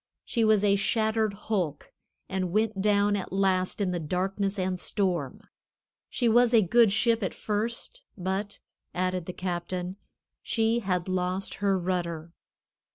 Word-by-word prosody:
She 230 - 0
was 215 -2 +4
a 200 -1 +4
shattered 220 +1 +1
hulk 185 -8 -3 0.3
and 185 -2 -2
went 215 0 +1
down 205 0 +3
at 195 - -4
last 190 -1 +1
in 195 -3 0
the 175 - -2
darkness 195 +5 -1
and 185 -1 -1
storm. 180 -11 -1 0.7
She 245 - 0
was 240 +1 +5
a 220 - +6
good 230 +3 +5
ship 230 +2 +2
at 190 - -2
first, 230 - -3
but," 190 +2 -3 0.4
added 185 -1 -1
the - - -3
captain, 180 +1 -4 0.4
"she 225 0 +1
had 185 -5 -1
lost 185 +1 -2
her 200 -1 +3
rudder." 170 -3 -3
195 Hz, 145 wpm, -27 LUFS, 180-215 Hz, 0.7 s, a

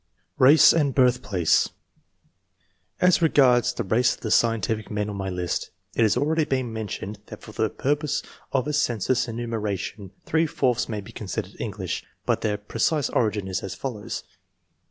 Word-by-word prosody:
RACE 140 +4 +8
AND 145 -5 +1
BIRTHPLACE. 125 - +3 1.3
As 180 -1 +4
regards 130 -7 +4
the - - -3
race 115 +5 +2
of - - -24
the 110 - -3
scientific 115 -1 +1
men 105 0 -2
on - - -6
my 95 -1 -3
list, 90 -2 -2 0.3
it - - +1
has 110 -3 +3
already 160 +2 +2
been 130 -5 -2
mentioned 105 -1 -5
that - - -10
for - - -10
the 110 0 0
purposes 145 +2 -1 0.3
of 135 0 0
a 150 - -1
census 125 -2 +1
enumeration 110 -4 -4 0.2
three 160 +1 +2
fourths 125 -5 0
may 105 -2 -3
be 105 +4 -12
considered 100 -2 -5
English, 100 -5 -4 0.2
but - - +1
their 105 -1 0
precise 115 +8 0
origin 105 -4 0
is 95 - -2
as 95 - -6
follows. 115 -6 -5
115 Hz, 160 wpm, -25 LUFS, 105-130 Hz, 1.3 s, RACE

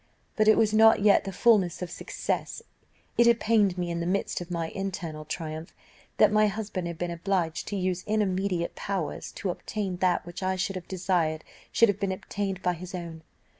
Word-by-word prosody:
"But 215 -1 +2
it 215 - +7
was 215 -1 +3
not 220 -1 +6
yet 205 -1 +5
the 195 - -3
fulness 190 -4 +3
of 175 - -6
success; - - -3 0.6
it 235 - +7
had 235 0 +5
pained 210 -5 +3
me 175 -1 -2
in 170 - -2
the 170 - -2
midst 190 0 -1
of 175 - -7
my 165 -2 -2
internal 170 -6 -5
triumph, 155 0 -6 0.4
that 210 - +6
my 215 0 +4
husband 200 -3 -3
had 170 -1 -5
been 175 +1 -3
obliged 170 -1 -1
to 205 - -3
use 185 -1 -1
intermediate 195 -4 0
powers 185 -7 -4
to 195 - -2
obtain 195 0 -4
that 180 -1 +1
which 175 +2 -8
I 190 0 0
should 195 +1 -2
have 180 -2 -6
desired 175 -4 0 0.3
should 230 - +5
have 205 -1 0
been 195 -2 0
obtained 195 0 -4
by 180 - +2
his 180 +2 -8
own. 170 -2 -7
185 Hz, 200 wpm, -27 LUFS, 175-205 Hz, 0.6 s, it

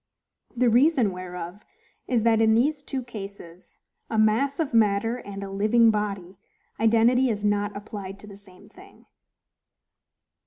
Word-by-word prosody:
The 250 +1 +3
reason 250 -3 +3
whereof 180 +1 -8 0.4
is, 240 -4 +1
that, 225 -1 +3
in 220 0 +4
these 285 +5 +1
two 270 -2 -5
cases—a 200 -2 -10
MASS 225 +7 +2
OF 315 -6 -2
MATTER 225 +1 +2
and 200 -4 -8
a 195 - -7
LIVING 215 +3 +3
BODY—identity 220 +5 0
is 210 -2 -2
not 205 0 0
applied 200 -2 -8
to 200 - -14
the 205 -1 -12
same 200 0 -17
thing. 375 - -18
215 Hz, 130 wpm, -25 LUFS, 200-235 Hz, 0.4 s, in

